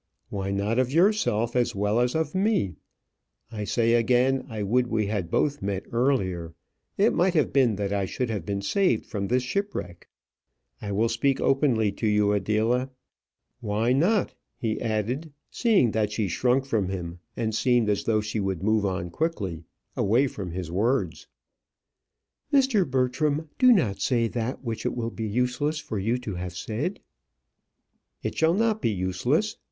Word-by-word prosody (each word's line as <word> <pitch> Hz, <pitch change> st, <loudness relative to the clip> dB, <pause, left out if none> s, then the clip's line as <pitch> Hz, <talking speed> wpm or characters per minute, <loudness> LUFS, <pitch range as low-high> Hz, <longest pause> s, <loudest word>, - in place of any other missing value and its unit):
"Why 100 Hz, -1 st, -3 dB
not 100 Hz, +4 st, 0 dB
of 130 Hz, 0 st, +1 dB
yourself 160 Hz, -, +2 dB
as 120 Hz, -4 st, +1 dB
well 105 Hz, +3 st, +1 dB
as 125 Hz, +2 st, +1 dB
of 160 Hz, -2 st, -1 dB
me? 190 Hz, -, +1 dB, 0.8 s
I 105 Hz, -2 st, -4 dB
say 115 Hz, +2 st, +2 dB
again, 125 Hz, +3 st, +2 dB
I 110 Hz, -3 st, -4 dB
would 120 Hz, +5 st, +2 dB
we 110 Hz, -3 st, 0 dB
had 100 Hz, -4 st, -2 dB
both 145 Hz, +8 st, 0 dB
met 100 Hz, -1 st, -2 dB
earlier. 95 Hz, -10 st, 0 dB, 0.4 s
It 210 Hz, +4 st, +4 dB
might 180 Hz, +1 st, +2 dB
have 155 Hz, -, +2 dB
been 125 Hz, -6 st, +3 dB
that 100 Hz, 0 st, -2 dB
I 100 Hz, -1 st, 0 dB
should 120 Hz, +5 st, -3 dB
have 100 Hz, -6 st, -3 dB
been 100 Hz, +2 st, -3 dB
saved 180 Hz, -, +1 dB
from 100 Hz, -2 st, -3 dB
this 125 Hz, +3 st, +1 dB
shipwreck. 125 Hz, -, -4 dB, 0.7 s
I 105 Hz, -, -4 dB
will 110 Hz, +4 st, +2 dB
speak 130 Hz, +4 st, +1 dB
openly 125 Hz, -7 st, +2 dB
to 110 Hz, +3 st, -2 dB
you, 105 Hz, -1 st, +3 dB
Adela. 110 Hz, +6 st, +1 dB, 0.7 s
Why 110 Hz, +1 st, 0 dB
not?" 180 Hz, +9 st, +2 dB, 0.2 s
he 110 Hz, -2 st, -2 dB
added, 120 Hz, +7 st, -2 dB, 0.2 s
seeing 205 Hz, -, +3 dB
that 105 Hz, -1 st, 0 dB
she 105 Hz, -1 st, -1 dB
shrunk 125 Hz, +8 st, +1 dB
from 110 Hz, -8 st, 0 dB
him, 90 Hz, -2 st, -5 dB, 0.2 s
and 110 Hz, -2 st, -1 dB
seemed 120 Hz, +1 st, +2 dB
as 105 Hz, -1 st, 0 dB
though 110 Hz, -1 st, +2 dB
she 105 Hz, +1 st, -3 dB
would 95 Hz, -3 st, -2 dB
move 110 Hz, -1 st, +2 dB
on 90 Hz, -2 st, -3 dB
quickly 95 Hz, -, -3 dB, 0.3 s
away 115 Hz, +7 st, +3 dB
from 100 Hz, -8 st, -5 dB
his 85 Hz, -1 st, -5 dB
words. 100 Hz, -2 st, 0 dB, 1.2 s
"Mr. 260 Hz, -, +3 dB
Bertram, 145 Hz, +4 st, 0 dB
do 255 Hz, 0 st, +7 dB
not 110 Hz, -, +2 dB
say 115 Hz, +1 st, +2 dB
that 120 Hz, +3 st, -3 dB
which 115 Hz, -3 st, -4 dB
it -, -, -2 dB
will 115 Hz, -1 st, -3 dB
be 110 Hz, -1 st, -4 dB
useless 125 Hz, +7 st, 0 dB
for 110 Hz, -8 st, -4 dB
you 115 Hz, +6 st, 0 dB
to 120 Hz, -5 st, -6 dB
have 90 Hz, 0 st, -5 dB
said." 140 Hz, -, -3 dB, 1.2 s
"It -, -, -3 dB
shall 160 Hz, +2 st, +3 dB
not 220 Hz, 0 st, +1 dB
be -, -, +1 dB
useless. 95 Hz, -3 st, 0 dB
115 Hz, 170 wpm, -26 LUFS, 100-135 Hz, 1.2 s, do